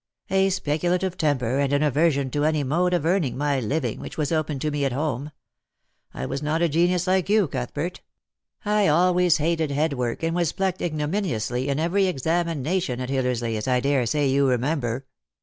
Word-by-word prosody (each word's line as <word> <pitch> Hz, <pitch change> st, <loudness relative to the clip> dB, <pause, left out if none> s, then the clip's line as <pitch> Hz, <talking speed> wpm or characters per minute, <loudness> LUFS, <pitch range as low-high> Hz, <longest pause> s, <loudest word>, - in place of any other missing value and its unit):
" -, -, -46 dB
A 190 Hz, 0 st, +3 dB
speculative 180 Hz, +1 st, 0 dB
temper, 135 Hz, -6 st, 0 dB
and 140 Hz, -1 st, +1 dB
an 145 Hz, +1 st, +2 dB
aversion 145 Hz, -2 st, +2 dB
to 145 Hz, +2 st, 0 dB
any 155 Hz, -1 st, +1 dB
mode 170 Hz, +7 st, +1 dB
of 160 Hz, -, -1 dB
earning 165 Hz, -8 st, +1 dB
my 145 Hz, -1 st, 0 dB
living 125 Hz, 0 st, -2 dB
which -, -, -8 dB
was 150 Hz, -3 st, -1 dB
open 155 Hz, -2 st, 0 dB
to 150 Hz, +3 st, -2 dB
me 145 Hz, -1 st, -1 dB
at 135 Hz, -2 st, 0 dB
home. 145 Hz, 0 st, -2 dB, 0.8 s
I 65 Hz, -, -5 dB
was 135 Hz, -, -4 dB
not 155 Hz, +3 st, 0 dB
a 170 Hz, -, +3 dB
genius 175 Hz, +3 st, +2 dB
like 185 Hz, 0 st, +1 dB
you, 210 Hz, -3 st, +4 dB
Cuthbert. 145 Hz, +6 st, -4 dB, 0.6 s
I 210 Hz, -1 st, +2 dB
always 180 Hz, +2 st, +4 dB
hated 160 Hz, 0 st, 0 dB
head 145 Hz, +2 st, 0 dB
work, 125 Hz, +1 st, -3 dB
and 165 Hz, +1 st, 0 dB
was 175 Hz, -3 st, 0 dB
plucked 190 Hz, -1 st, -1 dB
ignominiously 150 Hz, -, -2 dB
in 140 Hz, -, 0 dB
every 185 Hz, +4 st, +2 dB
examination 165 Hz, -2 st, -1 dB
at 125 Hz, 0 st, -4 dB
Hillersley, 125 Hz, -4 st, -1 dB
as 105 Hz, -, -4 dB
I 125 Hz, -1 st, +3 dB
daresay 140 Hz, +1 st, +1 dB
you 135 Hz, +1 st, +3 dB
remember. 125 Hz, -1 st, -1 dB
150 Hz, 185 wpm, -24 LUFS, 135-175 Hz, 0.8 s, you